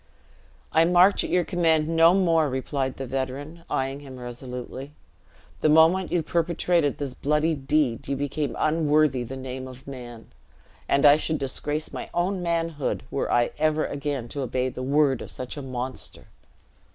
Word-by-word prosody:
"I 160 - +5
march 180 +3 +5
at - - -4
your 180 - +2
command 160 -3 +2
no 165 +2 +5
more," 165 -5 +3
replied 130 0 -2
the 135 - -5
veteran, 135 +5 -4
eying 135 +1 -1
him 135 -3 -10
resolutely: 125 +3 -7 0.7
"the 155 - +2
moment 165 +4 +5
you 175 -2 +1
perpetrated 170 -2 +1
this 140 -3 -4
bloody 150 +4 +1
deed, 135 -4 0
you 140 - -1
became 145 +1 -2
unworthy 155 -4 +2
the 130 +3 -6
name 130 0 -6
of 130 0 -12
man; 120 -4 -10 0.6
and 140 +1 +3
I 145 0 +8
should 155 0 -1
disgrace 145 +3 -2
my - - -6
own 180 +2 0
manhood, 165 -4 -1
were 140 - -1
I 120 0 +2
ever 155 0 +2
again 140 -4 -3
to 140 - -4
obey 130 0 -1
the 130 - -7
word 140 -1 +2
of - - -7
such 125 -1 -5
a 145 - -6
monster!" 130 -1 -6
145 Hz, 165 wpm, -25 LUFS, 130-160 Hz, 0.7 s, I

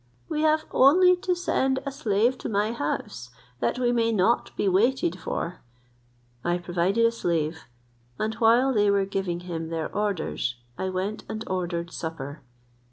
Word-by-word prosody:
We 305 - -2
have 310 0 +3
only 360 +7 +6
to 360 0 0
send 270 -7 +1
a 275 - -2
slave 230 0 +1
to - - -4
my 210 +1 +1
house, 145 - -4 0.3
that 120 - 0
we 245 -1 +2
may 230 -1 +2
not 220 +2 +2
be - - +1
waited 195 -2 +2
for. 170 +2 -4 0.8
I 175 0 +1
provided 180 +5 +1
a 230 - +4
slave; 160 -7 -2 0.5
and 215 +1 -1
while 235 +4 +4
they 205 -2 +3
were 200 -1 +3
giving 190 -3 -2
him 165 -2 -5
their 165 -1 -4
orders, 200 -11 -1 0.2
I 190 - -2
went 190 +3 -3
and 220 0 -4
ordered 175 -2 -2
supper. 155 -3 -6
200 Hz, 160 wpm, -26 LUFS, 170-235 Hz, 0.8 s, only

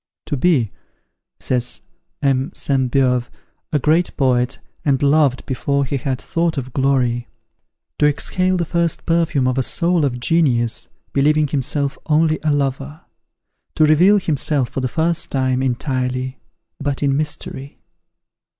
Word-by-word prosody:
"To - - -2
be," 130 - +2 0.7
says 125 -1 -1 0.4
M. 135 0 +1
Sainte 130 -3 0
Beuve, 125 -2 +1 0.4
"a 150 - +2
great 160 +5 +1
poet, 125 -2 +1 0.3
and 140 -2 +1
loved 140 -2 +3
before 140 +1 0
he 140 +2 -2
had 130 -1 -2
thought 165 -1 -1
of 130 -2 -5
glory! 125 -3 +1 0.7
To 150 - +5
exhale 185 +5 0
the 170 - 0
first 170 0 -1
perfume 165 -6 +1
of 130 +1 0
a - - +3
soul 170 +5 +1
of 125 -3 -1
genius, 125 -5 +1 0.3
believing 150 +2 +3
himself 140 0 -1
only 155 0 +2
a 155 - +2
lover! 140 +2 -2 0.7
To 155 - +4
reveal 175 +7 +5
himself, 145 -6 +1
for - - -4
the 130 - 0
first 165 +5 0
time, 130 -1 +1
entirely, 130 0 -2 0.4
but 140 0 -2
in 140 -1 +2
mystery!" 145 -2 -4
140 Hz, 140 wpm, -19 LUFS, 130-155 Hz, 0.7 s, To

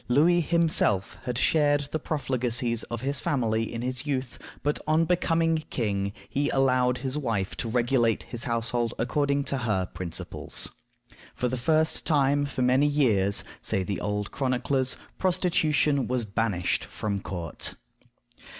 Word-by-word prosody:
Louis 165 +7 +4
himself 160 - +1
had 125 -2 -2
shared 145 +1 +3
the 155 - -1
profligacies 125 -5 0
of 120 -1 -5
his 140 +1 -1
family 115 -3 0
in 115 0 -4
his 125 +1 -1
youth, 130 -3 -2 0.2
but, 145 +1 +1
on 155 +2 +3
becoming 165 -2 +2
king, 100 -4 -1 0.2
he 145 +1 0
allowed 125 -2 +2
his 130 +3 -2
wife 115 -8 -1
to 115 - -3
regulate 120 -1 +2
his 120 +1 -4
household 115 -1 -1
according 140 +3 +1
to 135 -1 -2
her 105 -6 0
principles. 90 -1 -3 0.6
For 125 - 0
the 130 - -1
first 155 +5 +1
time 145 -2 +2
for 130 -2 -2
many 130 +3 +4
years, 110 -10 +2 0.2
say 95 - 0
the 100 +1 -3
old 105 0 -2
chroniclers, 130 0 0 0.2
prostitution 155 - +2
was 125 -2 0
banished 100 -4 0
from 100 -2 -3
court. 85 -4 -4
125 Hz, 140 wpm, -27 LUFS, 115-145 Hz, 0.6 s, Louis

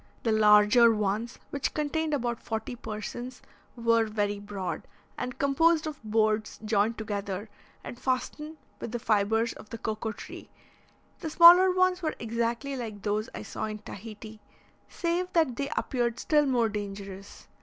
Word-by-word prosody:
The 225 - +1
larger 215 +2 +6
ones, 215 +2 -1
which 280 -1 -2
contained 310 +1 -1
about 240 -3 -2
forty 220 +2 -4
persons, 240 +3 -6 0.4
were 230 -1 +2
very 205 -1 -1
broad, 200 -3 -5 0.3
and 250 - -5
composed 310 +4 +3
of 305 -2 -6
boards 215 0 0
joined 215 +1 +1
together 205 -1 -4 0.3
and 240 - -8
fastened 300 +5 -2 0.2
with 235 - -6
the - - 0
fibres 225 +1 +1
of 210 - -13
the 230 - -6
cocoa 220 0 -3
tree; - - -10 0.7
the 325 - -4
smaller 345 +4 +9
ones 370 0 +2
were 315 -2 -2
exactly 235 +4 -2
like 220 -5 -6
those 210 +1 -1
I - - -6
saw - - -4
in 215 0 -4
Tahiti, 215 +1 -10 0.5
save 355 +1 -1
that 315 -8 +2
they 280 +2 -3
appeared 240 -3 -1
still 295 +1 +3
more 245 -4 +2
dangerous. 200 -2 -7
230 Hz, 150 wpm, -28 LUFS, 210-275 Hz, 0.7 s, smaller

